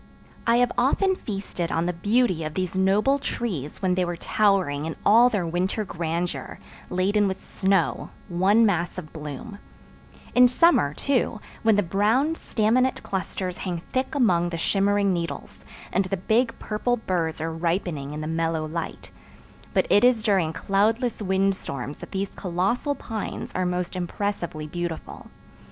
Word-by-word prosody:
I 230 Hz, -, +5 dB
have 245 Hz, 0 st, +3 dB
often 375 Hz, +10 st, +2 dB
feasted 195 Hz, -, -4 dB
on 165 Hz, +1 st, 0 dB
the 180 Hz, -, 0 dB
beauty 205 Hz, -1 st, +1 dB
of 155 Hz, 0 st, -5 dB
these 185 Hz, -1 st, -2 dB
noble 205 Hz, +9 st, +3 dB
trees 190 Hz, -, -4 dB
when 185 Hz, -1 st, +3 dB
they 180 Hz, 0 st, +1 dB
were 175 Hz, -1 st, -3 dB
towering 185 Hz, -9 st, +1 dB
in 160 Hz, -, -4 dB
all 235 Hz, +4 st, +7 dB
their 205 Hz, -7 st, -1 dB
winter 185 Hz, +6 st, -1 dB
grandeur, 170 Hz, 0 st, -3 dB, 0.3 s
laden 200 Hz, +3 st, +2 dB
with 190 Hz, 0 st, -4 dB
snow—one 190 Hz, +2 st, +1 dB
mass 175 Hz, -4 st, 0 dB
of 155 Hz, -4 st, -8 dB
bloom; 160 Hz, +8 st, -7 dB, 0.7 s
in 250 Hz, 0 st, +7 dB
summer, 245 Hz, -, +3 dB
too, 255 Hz, -5 st, 0 dB, 0.2 s
when 220 Hz, -2 st, +4 dB
the 205 Hz, -, +2 dB
brown, 215 Hz, -, +2 dB
staminate 250 Hz, -2 st, +1 dB
clusters 185 Hz, -1 st, -3 dB
hang 175 Hz, -3 st, -4 dB
thick 260 Hz, +3 st, -1 dB
among 175 Hz, -10 st, +3 dB
the 170 Hz, -, -4 dB
shimmering 200 Hz, +2 st, +2 dB
needles, 170 Hz, -5 st, -5 dB, 0.3 s
and 190 Hz, +1 st, +2 dB
the 195 Hz, +1 st, -2 dB
big 230 Hz, +6 st, +1 dB
purple 245 Hz, +3 st, -1 dB
burrs 170 Hz, -7 st, -2 dB
are 165 Hz, +1 st, -2 dB
ripening 165 Hz, -3 st, -2 dB
in 150 Hz, +1 st, -5 dB
the -, -, -4 dB
mellow 160 Hz, 0 st, -1 dB
light; 165 Hz, +2 st, -5 dB, 0.6 s
but -, -, +2 dB
it 205 Hz, -, +5 dB
is 245 Hz, -3 st, +4 dB
during 190 Hz, -7 st, +2 dB
cloudless 215 Hz, +8 st, 0 dB
wind 195 Hz, 0 st, +2 dB
storms 140 Hz, -6 st, -6 dB
that -, -, -9 dB
these 195 Hz, 0 st, -3 dB
colossal 195 Hz, -, -1 dB
pines 220 Hz, -5 st, -5 dB
are 185 Hz, 0 st, 0 dB
most 180 Hz, 0 st, -2 dB
impressively 175 Hz, -3 st, -3 dB
beautiful. 170 Hz, +1 st, -5 dB
190 Hz, 155 wpm, -25 LUFS, 170-220 Hz, 0.7 s, all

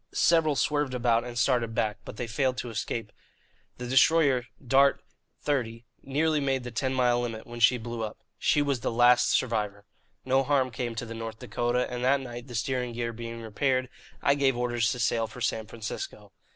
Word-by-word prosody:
Several 160 Hz, -3 st, +4 dB
swerved 145 Hz, -1 st, 0 dB
about 120 Hz, -1 st, +2 dB
and 120 Hz, -1 st, -7 dB
started 120 Hz, -3 st, +1 dB
back, 105 Hz, -1 st, 0 dB
but -, -, -9 dB
they 125 Hz, -, -2 dB
failed 130 Hz, +3 st, 0 dB
to 120 Hz, -, -4 dB
escape. 115 Hz, -1 st, -4 dB, 0.7 s
The 125 Hz, -, -6 dB
destroyer, 135 Hz, -1 st, +4 dB, 0.2 s
Dart 135 Hz, +3 st, +4 dB, 0.4 s
XXX, 120 Hz, -5 st, -1 dB, 0.2 s
nearly 150 Hz, +3 st, +1 dB
made 135 Hz, -2 st, 0 dB
the 125 Hz, -, -6 dB
ten 130 Hz, +3 st, -1 dB
mile 125 Hz, -2 st, +2 dB
limit 115 Hz, -2 st, -4 dB
when 120 Hz, 0 st, -8 dB
she 120 Hz, +2 st, +5 dB
blew 120 Hz, 0 st, -5 dB
up. 110 Hz, -, -5 dB, 0.2 s
She 145 Hz, -, +3 dB
was 140 Hz, -3 st, 0 dB
the -, -, -2 dB
last 120 Hz, +1 st, +5 dB
survivor. 105 Hz, -4 st, 0 dB, 0.4 s
No 130 Hz, +1 st, +3 dB
harm 135 Hz, -2 st, +1 dB
came 120 Hz, 0 st, -4 dB
to 115 Hz, -, -4 dB
the 115 Hz, -, -7 dB
North 115 Hz, -1 st, -6 dB
Dakota, 125 Hz, 0 st, -1 dB
and 125 Hz, 0 st, -4 dB
that 140 Hz, +2 st, +4 dB
night, 120 Hz, -1 st, -8 dB
the 120 Hz, -, -8 dB
steering 125 Hz, 0 st, -1 dB
gear 115 Hz, 0 st, -3 dB
being 115 Hz, 0 st, -7 dB
repaired, 130 Hz, +3 st, 0 dB, 0.3 s
I 140 Hz, -, +5 dB
gave 135 Hz, -3 st, +2 dB
orders 120 Hz, -2 st, +1 dB
to -, -, -3 dB
sail 115 Hz, -1 st, +1 dB
for 110 Hz, -, -11 dB
San 110 Hz, -2 st, -1 dB
Francisco." 115 Hz, -1 st, -7 dB
120 Hz, 190 wpm, -28 LUFS, 115-130 Hz, 0.7 s, she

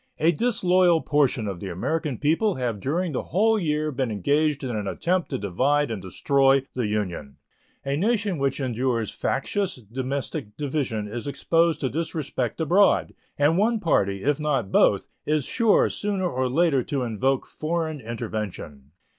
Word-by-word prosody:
A 165 Hz, +2 st, +3 dB
disloyal 180 Hz, -4 st, +3 dB
portion 135 Hz, -7 st, +1 dB
of 95 Hz, -3 st, -4 dB
the 95 Hz, -, -6 dB
American 145 Hz, -, -2 dB
people 165 Hz, -, +1 dB
have 120 Hz, -5 st, -2 dB
during 165 Hz, -, -1 dB
the 130 Hz, -, -3 dB
whole 220 Hz, +4 st, +2 dB
year 155 Hz, -3 st, 0 dB
been 130 Hz, -2 st, -1 dB
engaged 145 Hz, -, +1 dB
in 125 Hz, -3 st, -3 dB
an 105 Hz, -2 st, -3 dB
attempt 175 Hz, -, -1 dB
to -, -, -2 dB
divide 130 Hz, +9 st, +1 dB
and 105 Hz, -4 st, -4 dB
destroy 135 Hz, +8 st, +2 dB
the 125 Hz, -4 st, -1 dB
Union. 90 Hz, -10 st, -3 dB, 0.5 s
A 140 Hz, 0 st, 0 dB
nation 205 Hz, -2 st, 0 dB
which 135 Hz, 0 st, 0 dB
endures 125 Hz, -3 st, -1 dB
factious 190 Hz, +8 st, -1 dB
domestic 125 Hz, -1 st, -5 dB
division 135 Hz, -8 st, -2 dB
is 120 Hz, +5 st, -6 dB
exposed 165 Hz, +3 st, +1 dB
to 130 Hz, -, 0 dB
disrespect 155 Hz, -5 st, -3 dB
abroad, 180 Hz, +6 st, +3 dB, 0.2 s
and 150 Hz, +5 st, +3 dB
one 225 Hz, +2 st, +2 dB
party, 100 Hz, -, +1 dB
if 145 Hz, +1 st, +1 dB
not 135 Hz, -9 st, -1 dB
both, -, -, +3 dB, 0.2 s
is 150 Hz, -2 st, +1 dB
sure 230 Hz, -3 st, +3 dB
sooner 200 Hz, -3 st, -1 dB
or 130 Hz, -5 st, -1 dB
later 150 Hz, -1 st, +3 dB
to 135 Hz, +1 st, -2 dB
invoke 125 Hz, +3 st, 0 dB
foreign 160 Hz, -1 st, -3 dB
intervention. 105 Hz, -, -6 dB
140 Hz, 155 wpm, -25 LUFS, 115-165 Hz, 0.5 s, A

